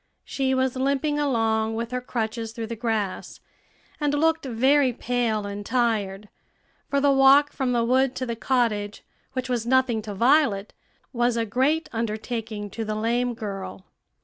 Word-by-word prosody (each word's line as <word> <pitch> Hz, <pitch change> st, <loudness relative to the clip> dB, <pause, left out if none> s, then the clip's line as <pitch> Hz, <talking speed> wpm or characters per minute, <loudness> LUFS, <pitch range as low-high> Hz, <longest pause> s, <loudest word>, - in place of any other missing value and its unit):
She 265 Hz, -1 st, 0 dB
was 260 Hz, -1 st, 0 dB
limping 280 Hz, +3 st, 0 dB
along 225 Hz, -5 st, +1 dB
with 230 Hz, +1 st, -4 dB
her 250 Hz, 0 st, -2 dB
crutches 225 Hz, -2 st, -3 dB
through 230 Hz, -1 st, -4 dB
the 230 Hz, +1 st, -5 dB
grass, 220 Hz, -4 st, -3 dB, 0.6 s
and 290 Hz, -1 st, +1 dB
looked 320 Hz, 0 st, +1 dB
very 260 Hz, +3 st, +3 dB
pale 235 Hz, -3 st, -1 dB
and 200 Hz, 0 st, -5 dB
tired; 210 Hz, -4 st, -1 dB, 0.6 s
for 280 Hz, -, +1 dB
the 285 Hz, 0 st, +4 dB
walk 275 Hz, +2 st, +5 dB
from 265 Hz, -3 st, -1 dB
the 240 Hz, -1 st, +2 dB
wood 260 Hz, +2 st, +2 dB
to 255 Hz, -, -3 dB
the 235 Hz, -2 st, -3 dB
cottage, 220 Hz, -5 st, -1 dB, 0.3 s
which 255 Hz, -1 st, -3 dB
was 240 Hz, -2 st, -2 dB
nothing 255 Hz, -3 st, +2 dB
to 210 Hz, -1 st, -7 dB
Violet, 235 Hz, -3 st, +2 dB, 0.4 s
was 240 Hz, -1 st, +1 dB
a 230 Hz, -, 0 dB
great 270 Hz, +9 st, +1 dB
undertaking 220 Hz, -2 st, -4 dB
to 225 Hz, -, -4 dB
the 215 Hz, 0 st, -3 dB
lame 240 Hz, +3 st, 0 dB
girl. 195 Hz, -3 st, -6 dB
235 Hz, 160 wpm, -25 LUFS, 220-265 Hz, 0.6 s, walk